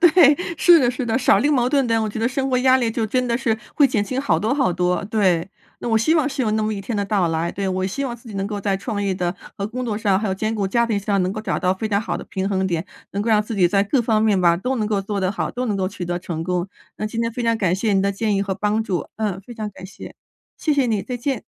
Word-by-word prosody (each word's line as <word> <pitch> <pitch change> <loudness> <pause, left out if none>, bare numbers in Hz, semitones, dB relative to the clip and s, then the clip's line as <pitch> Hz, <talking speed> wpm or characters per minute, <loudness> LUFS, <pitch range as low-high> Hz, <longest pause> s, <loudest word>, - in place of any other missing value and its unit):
对。 330 -4 +7 0.2
是 345 +1 +7
的 250 -5 +3
是 255 +1 -4
的， 230 +2 +1
少 255 - +4
一 - - 0
了 - - +2
个 - - +3
矛 250 -3 +2
盾 275 -2 +2
点， 230 -1 +2
我 220 - -1
觉 215 - -5
得 230 - +1
生 265 +1 -1
活 255 - +1
压 260 0 +5
力 240 -3 0
就 225 0 -1
真 255 +3 0
的 235 -1 +1
是 225 -4 0 0.2
会 285 - +6
减 215 -5 0
轻 255 +6 -2
好 280 - +1
多 220 +5 0
好 225 -11 +2
多， 180 +2 0
对。 195 -5 +1 0.3
那 - - -3
我 225 -1 +3
希 310 +9 +2
望 310 -5 +3
是 275 -1 -3
有 230 -4 +1
那 215 0 +1
么 215 0 0
一 200 - -4
天 215 +2 -4
的 200 - 0
到 200 -4 +1
来， 165 +1 -1
对， 195 0 -2
我 185 0 -1
希 275 +9 -3
望 240 -3 -4
自 235 0 -15
己 210 - -9
能 195 0 -1
够 205 -1 -4
在 195 -1 0
创 205 +1 -3
业 195 -1 0
的 180 -1 -2 0.2
和 200 - -1
工 250 +4 -4
作 215 -3 -2
上， 195 -3 +2
还 215 - -2
有 190 - 0
兼 215 +3 -2
顾 205 -3 -1
家 235 +4 +2
庭 215 -3 0
上， 200 -1 0
能 185 - 0
够 215 - -4
找 - - -1
到 185 -1 +1
非 220 +3 -3
常 200 -1 +1
好 - - -3
的 - - -8
平 190 +1 -2
衡 190 -1 0
点， 170 -1 -1 0.3
能 200 - -3
够 230 - -2
让 215 -1 +4
自 225 - -5
己 180 -4 +4
在 195 +1 +3
各 250 +6 +1
方 220 -2 +1
面 210 -4 +3
吧， 170 -1 +4
都 255 +8 -2
能 215 -3 -1
够 205 -2 0
做 200 0 -3
得 185 0 +1
好， 200 - -2
都 250 +1 -3
能 210 -3 -1
够 190 -1 0
取 185 -2 -6
得 175 0 -2
成 165 -3 -5
功， 180 0 -1 0.3
那 215 - -3
今 225 +2 -3
天 230 0 0
非 240 +2 -4
常 230 -1 +1
感 180 -3 +2
谢 205 +2 0
您 195 - +3
的 200 +1 +1
建 210 +1 0
议 - - +1
和 195 -1 -1
帮 210 +3 0
助。 180 -8 -3
嗯， 210 -4 -2
非 240 - -11
常 215 -3 -4
感 190 -1 -12
谢， 190 - -10 0.4
谢 310 - 0
谢 275 -3 +2
你， 215 -4 0
再 250 +6 -4
见。 255 0 -2
215 Hz, 350 characters per minute, -21 LUFS, 195-240 Hz, 0.4 s, 对